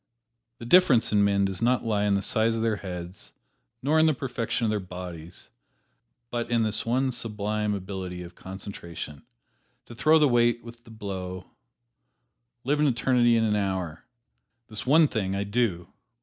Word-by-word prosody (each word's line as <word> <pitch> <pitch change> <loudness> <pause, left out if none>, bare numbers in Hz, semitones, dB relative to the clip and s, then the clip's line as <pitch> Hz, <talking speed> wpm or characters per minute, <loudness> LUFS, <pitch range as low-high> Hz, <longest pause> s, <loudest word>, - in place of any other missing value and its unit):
The 115 - -9
difference 135 -6 +5
in 105 -1 +4
men 100 -1 +3
does 95 0 -3
not 120 +1 +2
lie 105 -2 +1
in 100 -1 +2
the 100 - -1
size 115 +1 +1
of 115 - -1
their 110 -2 +1
heads, 90 -1 -8 0.5
nor 155 +4 +3
in 160 - +5
the 155 - +2
perfection 120 -3 -2
of 110 - +1
their 105 - 0
bodies, 90 -3 -9 0.8
but 120 -1 -2
in 115 -1 +2
this 110 +1 -2
one 130 +3 +1
sublime 105 -2 -2
ability 95 -2 -6
of 85 0 -11
concentration 85 -6 -8 0.6
to - - -11
throw 155 +7 +4
the 150 -2 +5
weight 120 -1 +2
with 120 0 -12
the - - -15
blow, 95 -4 -6 1.1
live 145 +3 +1
an 150 - +4
eternity 120 -2 +3
in 115 - +2
an 105 -1 +1
hour 95 -5 -2 0.7
"This 110 +2 -7
one 155 +3 +6
thing 95 -6 -2
I 100 - -1
do!" 100 -5 -1
105 Hz, 170 wpm, -26 LUFS, 95-120 Hz, 1.1 s, one